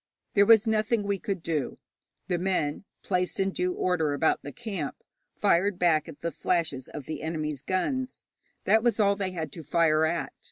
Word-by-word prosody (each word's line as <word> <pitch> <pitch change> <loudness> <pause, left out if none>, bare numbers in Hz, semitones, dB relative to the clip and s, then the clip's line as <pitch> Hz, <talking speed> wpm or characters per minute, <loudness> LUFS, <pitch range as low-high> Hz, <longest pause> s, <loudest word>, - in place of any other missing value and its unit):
There 200 0 +5
was 225 -1 +7
nothing 220 0 +1
we 200 -1 -1
could 195 -3 -3
do. 155 -6 -2 0.5
The 175 - 0
men, 180 -3 -1 0.2
placed 180 -1 -1
in 195 0 +1
due 180 -1 -1
order 165 -6 +1
about 160 +3 +2
the 145 - -7
camp, 195 - -4 0.4
fired 185 +2 +2
back 170 -3 +2
at 150 - -11
the 170 - -2
flashes 160 -9 -1
of 145 -3 -8
the 155 - -5
enemy's 155 -3 -3
guns. 255 - -2 0.4
That 220 - +4
was 235 -2 +1
all 200 -1 +4
they 195 -2 -2
had 160 -4 -4
to 165 - -8
fire 155 +1 +3
at. 170 +2 -2
180 Hz, 185 wpm, -27 LUFS, 155-200 Hz, 0.5 s, was